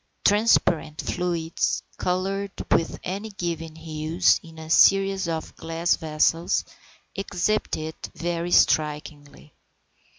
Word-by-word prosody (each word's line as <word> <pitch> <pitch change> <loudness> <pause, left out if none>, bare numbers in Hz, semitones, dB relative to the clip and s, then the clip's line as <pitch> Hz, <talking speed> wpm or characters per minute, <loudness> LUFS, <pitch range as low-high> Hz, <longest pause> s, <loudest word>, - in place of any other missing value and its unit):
Transparent 170 -7 +3
fluids, 170 -2 -1
coloured 195 +2 -1 0.2
with 165 - +1
any 200 +4 -4
given 170 -5 -4
hues, 160 +2 +1
in 165 -1 -14
a 160 0 -9
series 195 0 +4
of 160 -1 -4
glass 165 +1 0
vessels, 160 +2 +1 0.5
exhibit 195 +2 -1
it 155 0 -6
very 170 0 -2
strikingly. 150 -3 0
165 Hz, 100 wpm, -24 LUFS, 160-185 Hz, 0.5 s, series